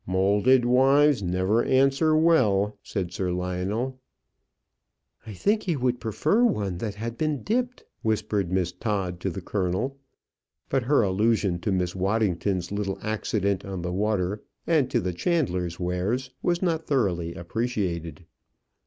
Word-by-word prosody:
"Moulded 100 +7 +3
wives 135 +2 +4
never 95 +5 +1
answer 135 +4 +3
well," 110 -11 +3
said 95 -5 -4
Sir 90 0 -1
Lionel. 95 +9 -2 1.3
"I 110 - -6
think 210 - +1
he 175 -4 -1
would 125 -2 0
prefer 150 - +1
one 100 - 0
that 105 -1 -4
had 115 +2 -5
been 155 -3 -1
dipped," 250 +3 -1 0.2
whispered 105 -4 -1
Miss 90 -2 0
Todd 90 -2 -2
to 95 - -2
the 95 +2 -6
colonel; 100 +9 -2 0.7
but 135 - +1
her 140 -2 +4
allusion 100 -2 +1
to 100 - -2
Miss 90 -1 -1
Waddington's 95 -2 0
little 100 -1 -2
accident 100 -2 -1
on 95 -3 -5
the 90 0 -3
water, 100 0 0 0.2
and 155 -6 +2
to 120 - +1
the 90 -5 -2
chandler's 90 - -1
wares, 95 +9 -1
was 175 +1 0
not 165 -3 0
thoroughly 90 - 0
appreciated. 90 -4 -3
105 Hz, 140 wpm, -26 LUFS, 90-130 Hz, 1.3 s, wives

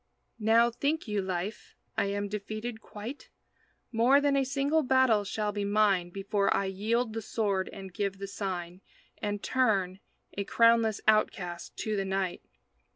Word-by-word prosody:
Now, 230 +2 +4
think 285 +5 -1
you, 210 -1 0
Life, 190 +3 -4 0.2
I - - +1
am 205 +1 -2
defeated 215 +3 -5
quite? 220 +8 -8 0.6
More 245 +4 +5
than 285 -1 +2
a 275 - +3
single 280 +4 +1
battle 260 -6 +3
shall 210 +1 -2
be 205 0 -3
mine 200 -3 +2
Before 200 +2 0
I 200 - +2
yield 220 +5 -1
the 225 - -3
sword 200 -3 -1
and 190 -2 -9
give 195 0 -2
the 195 - -5
sign 185 -3 -5 0.4
And 205 -1 -3
turn, 195 -8 +1 0.3
a 200 - -2
crownless 230 0 +3
outcast, 180 -5 +1
to 215 -1 -1
the 195 - 0
night. 190 -1 -2
210 Hz, 155 wpm, -29 LUFS, 195-230 Hz, 0.6 s, More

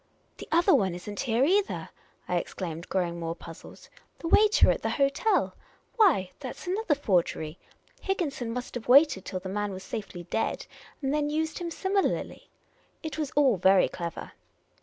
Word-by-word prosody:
" - - -40
The - - -8
other 345 +3 +4
one 190 -9 +2
is 180 +2 -10
n't 205 -1 -6
here, 250 0 +2
either," 395 +5 +1 0.4
I - - 0
exclaimed, 170 -2 -5
growing 175 -2 -1
more 165 0 -3
puzzled. 165 -2 -12 0.2
" - - -39
The 330 - -5
waiter 425 +4 +5
at - - -2
the - - -1
hotel! 280 +10 +1 0.4
Why, 320 - +4
that 260 -3 -6
's - - -11
another 370 -3 0
forgery! 175 - 0 0.4
Higginson 295 -11 -2
must 250 +1 -5
have 240 -2 -6
waited 270 -6 +5
till 185 - -4
the 190 - -6
man 205 +1 -2
was 190 0 -7
safely 195 -3 -6
dead, 225 +6 -2 0.4
and 270 +1 0
then 295 -1 0
used 315 +1 -2
him 345 -1 -3
similarly. 385 +3 -1 0.5
It 315 0 -5
was 300 -3 -1
all 270 -7 +4
very 190 +1 +5
clever. 170 -1 -6
250 Hz, 180 wpm, -28 LUFS, -, 0.5 s, waiter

